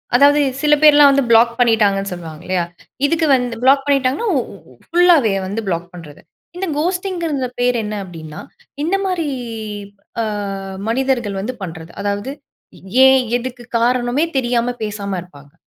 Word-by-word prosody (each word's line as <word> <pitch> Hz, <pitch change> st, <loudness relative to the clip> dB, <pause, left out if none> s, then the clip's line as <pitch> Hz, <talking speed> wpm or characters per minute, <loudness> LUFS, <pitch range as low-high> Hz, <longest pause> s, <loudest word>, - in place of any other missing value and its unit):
அதாவது 285 Hz, +3 st, +5 dB, 0.2 s
சில 300 Hz, 0 st, +3 dB
பேர்லாம் 295 Hz, -2 st, +7 dB
வந்து, 275 Hz, -1 st, +2 dB
ப்ளாக் 235 Hz, +1 st, +5 dB
பண்ணிட்டாங்கன்னு 205 Hz, -5 st, +2 dB
சொல்லுவாங்க 165 Hz, -2 st, -8 dB
இல்லையா? 185 Hz, -1 st, 0 dB, 0.4 s
இதுக்கு 325 Hz, +2 st, +1 dB
வந்து 245 Hz, -2 st, -2 dB
ப்ளாக் 270 Hz, +1 st, +5 dB
பண்ணிட்டாங்கன்னா 275 Hz, -, +1 dB
ஒ -, -, +3 dB
ஒ -, -, -11 dB, 0.2 s
ஒ -, -, -18 dB
ஃபுல்லாவே 335 Hz, -, +4 dB
வந்து 215 Hz, +4 st, -3 dB
ப்ளாக் 175 Hz, -1 st, -2 dB
பண்ணுறது. 160 Hz, -4 st, -12 dB, 0.4 s
இந்த 385 Hz, -, -3 dB
கோஸ்ட்டிங்கறந்த 340 Hz, -5 st, -2 dB
பேர் 245 Hz, 0 st, +2 dB
என்ன 210 Hz, 0 st, -4 dB
அப்படின்னா, 160 Hz, -4 st, -9 dB, 0.4 s
இந்த 355 Hz, +5 st, +1 dB
மாரி 360 Hz, -4 st, -1 dB, 0.9 s
அ -, -, 0 dB, 0.7 s
மனிதர்கள் 240 Hz, -5 st, -1 dB
வந்து 250 Hz, +6 st, -4 dB
பண்ணுறது. 165 Hz, -2 st, -8 dB
அதாவது 205 Hz, +5 st, -2 dB, 0.7 s
ஏன், 265 Hz, 0 st, +6 dB, 0.2 s
எதுக்கு 245 Hz, 0 st, -7 dB, 0.2 s
காரணமே 245 Hz, +4 st, +1 dB
தெரியாம, 245 Hz, -1 st, 0 dB
பேசாம 200 Hz, -2 st, -4 dB
இருப்பாங்க. 145 Hz, -4 st, -16 dB
245 Hz, 140 wpm, -18 LUFS, 200-285 Hz, 0.9 s, பேர்லாம்